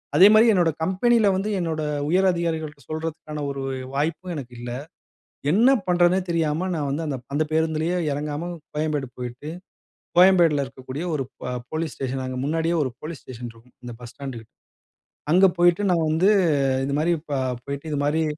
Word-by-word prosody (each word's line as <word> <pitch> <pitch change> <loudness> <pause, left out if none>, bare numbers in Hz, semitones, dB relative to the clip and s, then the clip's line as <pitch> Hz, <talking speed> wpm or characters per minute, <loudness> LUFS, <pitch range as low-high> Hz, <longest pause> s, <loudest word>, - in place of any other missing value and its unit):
அதேமாரி 210 +7 +8
என்னோட 175 -4 +3
கம்பெனில 210 +4 +3
வந்து 200 +3 -1
என்னோட 160 -3 -2 0.3
உயர் 190 +3 +3
அதிகாரிகள்ட்ட 160 -4 -3
சொல்றதுக்கான 155 -1 -5
ஒரு 140 -1 -4 0.3
வாய்ப்பும் 160 +5 -2
எனக்கு 125 -4 -7
இல்ல. 120 0 -6 0.8
என்ன 240 +8 +5
பண்றதுன்னே 175 +1 +4
தெரியாம 165 +2 0
நான் 145 -3 -2
வந்து 155 +4 -2
அந்தப் 130 -4 -4
அந்த 155 +2 +2
பேருந்துலயே 160 +2 +1
இறங்காம 150 +4 -3 0.2
கோயம்பேடு 150 -3 -1
போய்ட்டு, 125 +4 -6 0.7
கோயம்பேடுல 175 -6 +6
இருக்கக்கூடிய 130 +4 -7
ஒரு 135 - -2 0.2
ப 125 - -3 0.2
போலீஸ் 160 -1 -2
ஸ்டேஷன், 130 0 -3
அங்க 130 0 -4
முன்னாடியே 165 +2 0
ஒரு 130 -4 -2
போலீஸ் 155 -4 -7
ஸ்டேஷன் 120 -1 -8
இருக்கும். 115 +2 -22
இந்த 120 -1 -7
பஸ் 120 - -9
ஸ்டாண்டுக்கிட். 125 -6 -8 0.8
அங்க 185 +2 +7
போய்ட்டு 175 +3 +4
நான் 165 -2 +2
வந்து 165 +6 +3 0.6
இந்த 140 - -2
மாரி 170 +2 +2 0.2
ப - - -2 0.3
போய்ட்டு 140 +2 -5
இது 145 - -1
மாரி. 160 +2 +1
155 Hz, 155 wpm, -24 LUFS, 140-175 Hz, 0.8 s, அதேமாரி